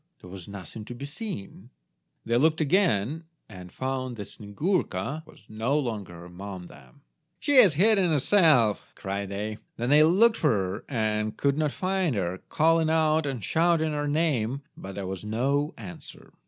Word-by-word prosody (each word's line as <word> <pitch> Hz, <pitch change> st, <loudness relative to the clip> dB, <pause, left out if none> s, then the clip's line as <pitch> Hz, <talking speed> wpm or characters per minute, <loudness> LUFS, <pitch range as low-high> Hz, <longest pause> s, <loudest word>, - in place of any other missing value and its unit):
There 90 Hz, -, -13 dB
was 95 Hz, -3 st, -9 dB
nothing 100 Hz, +1 st, -9 dB
to 120 Hz, -, -7 dB
be 140 Hz, -, -7 dB
seen. 140 Hz, -, -7 dB, 0.6 s
They 115 Hz, -, 0 dB
looked 160 Hz, +4 st, +3 dB
again, 155 Hz, -, +1 dB, 0.2 s
and 90 Hz, -4 st, -11 dB
found 130 Hz, -1 st, -3 dB
that 105 Hz, -3 st, -7 dB
Snyegurka 140 Hz, -, -2 dB
was -, -, -18 dB
no 115 Hz, +7 st, -1 dB
longer 100 Hz, -, -4 dB
among 90 Hz, +1 st, -8 dB
them. 140 Hz, +10 st, -16 dB, 0.4 s
"She 290 Hz, -2 st, +2 dB
has 190 Hz, -, +8 dB
hidden 195 Hz, +1 st, +4 dB
herself," 150 Hz, -, +3 dB
cried 100 Hz, 0 st, -4 dB
they. 105 Hz, +2 st, -4 dB, 0.2 s
Then 120 Hz, +3 st, -1 dB
they 150 Hz, +1 st, +7 dB
looked 210 Hz, +9 st, +5 dB
for 155 Hz, -, +2 dB
her, 100 Hz, -3 st, -1 dB, 0.4 s
but 110 Hz, -, -6 dB
could 140 Hz, +1 st, +1 dB
not 150 Hz, -2 st, +1 dB
find 185 Hz, -6 st, -1 dB
her, 90 Hz, -2 st, -2 dB
calling 160 Hz, 0 st, +3 dB
out 160 Hz, -1 st, +2 dB
and 130 Hz, -6 st, -4 dB
shouting 165 Hz, -, +2 dB
her 145 Hz, -1 st, -2 dB
name, 140 Hz, -4 st, 0 dB
but 95 Hz, 0 st, -9 dB
there 100 Hz, -, -4 dB
was 95 Hz, +1 st, -5 dB
no 135 Hz, +7 st, 0 dB
answer. 95 Hz, -6 st, -11 dB
135 Hz, 165 wpm, -27 LUFS, 100-160 Hz, 0.6 s, has